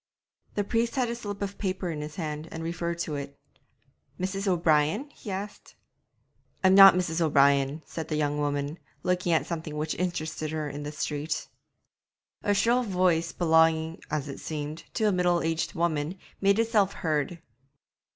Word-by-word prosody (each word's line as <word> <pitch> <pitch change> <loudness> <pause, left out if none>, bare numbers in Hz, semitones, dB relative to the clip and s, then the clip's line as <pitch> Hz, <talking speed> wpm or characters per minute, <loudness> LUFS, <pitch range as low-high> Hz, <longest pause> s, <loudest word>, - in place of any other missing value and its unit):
The 205 - +1
priest 230 +4 0
had 250 -3 +1
a - - -3
slip 205 -3 -5
of 200 0 -5
paper 185 -3 -2
in 150 -2 -4
his 150 0 -7
hand 155 -2 -4
and 160 - -5
referred 170 0 -2
to 160 - -3
it. 140 0 -7 0.8
'Mrs. 195 +2 -2
O'Brien?' 170 - +2
he 220 - -10
asked. 200 +2 -6 0.9
'I'm 190 0 +6
not 195 -1 +10
Mrs. 175 -2 0
O'Brien,' 140 -1 +3
said 160 -2 -6
the 155 - -2
young 150 -1 0
woman, 145 +2 -2 0.2
looking 180 -1 +1
at 160 - +2
something 160 -3 -5
which 155 +1 -1
interested 165 -3 -3
her 155 -1 -3
in 145 0 -6
the 145 0 -5
street. 150 0 -3 0.9
A 205 - +1
shrill 235 +5 +3
voice 180 -6 +1
belonging, 160 -1 +2
as 150 -1 -2
it 140 - -7
seemed, 155 0 -5
to 225 - 0
a 210 - +4
middle 180 -2 +2
aged 165 0 -1
woman, 165 +1 -1 0.2
made 200 +1 +4
itself 225 -4 +2
heard. 155 +2 0
165 Hz, 165 wpm, -27 LUFS, 150-190 Hz, 0.9 s, not